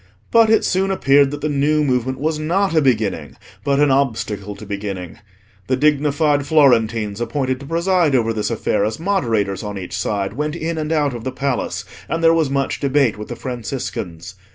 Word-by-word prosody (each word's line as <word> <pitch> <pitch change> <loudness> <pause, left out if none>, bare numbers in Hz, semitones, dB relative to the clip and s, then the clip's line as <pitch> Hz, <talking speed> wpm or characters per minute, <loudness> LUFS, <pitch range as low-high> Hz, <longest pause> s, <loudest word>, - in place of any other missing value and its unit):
But 230 -1 +5
it 220 - +4
soon 190 +1 +1
appeared 140 -7 +4
that 145 +1 -6
the 155 - 0
new 150 +1 +1
movement 130 -1 0
was 155 +1 -1
not 180 +5 0
a 160 - +4
beginning, 115 -7 0 0.3
but 140 0 +1
an 145 -1 +4
obstacle 110 -6 -1
to 105 - -10
beginning. 100 -2 -5 0.5
The 130 - +2
dignified 145 0 +2
Florentines 115 -8 +3
appointed 130 +2 -1
to 140 - -10
preside 170 -2 +2
over 115 -2 +1
this 105 -1 -2
affair 110 -2 0
as 110 +5 -2
moderators 115 - 0
on 105 -2 -5
each 90 -2 -7
side, 100 -1 -2
went 150 +5 -3
in 165 -1 -3
and 155 0 -3
out 145 -4 +1
of 120 -2 -7
the 130 - -3
Palace, 135 0 -2 0.2
and 165 0 -2
there 165 0 +6
was 160 -4 +2
much 135 0 -1
debate 140 -4 +2
with 105 - -6
the - - -6
Franciscans. 110 -8 -5
135 Hz, 190 wpm, -19 LUFS, 110-150 Hz, 0.5 s, there